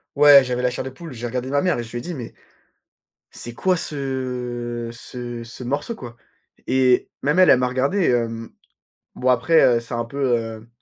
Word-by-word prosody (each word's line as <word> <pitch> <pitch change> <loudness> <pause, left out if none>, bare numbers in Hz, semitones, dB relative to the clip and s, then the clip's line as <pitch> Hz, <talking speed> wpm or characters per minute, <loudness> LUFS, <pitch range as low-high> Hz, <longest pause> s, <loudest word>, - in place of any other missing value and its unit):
Ouais, 145 -1 +8
j'avais 125 -1 -2
la 125 - +2
chair 125 - -4
de 130 - -5
poule. 160 +5 -10
J'ai 120 0 -6
regardé 125 +2 -3
ma 140 +1 +1
mère 180 -9 +1
et - - -3
je 115 - -11
lui - - -4
ai - - -4
dit: 175 - -6
«Mais, 125 -7 -7 1.0
c'est 120 - -8
quoi, 185 +10 +2
ce 125 -5 -4
ce 120 -1 -7
ce 120 +2 -10
morceau 145 - -2
quoi?» 120 - -10 0.5
et 130 -1 +3
même 150 +6 +2
elle, 185 - +7
elle - - +7
m'a 125 - +1
regardé, 140 +10 0
hem. 115 -2 -1 0.6
Bon, 130 - 0
après, 130 +7 +4 0.2
heu, - - 0
c'est 115 +1 -9
un 120 0 -1
peu, 140 +4 -8 0.2
heu 115 -1 -7
125 Hz, 205 wpm, -22 LUFS, 120-140 Hz, 1.0 s, Ouais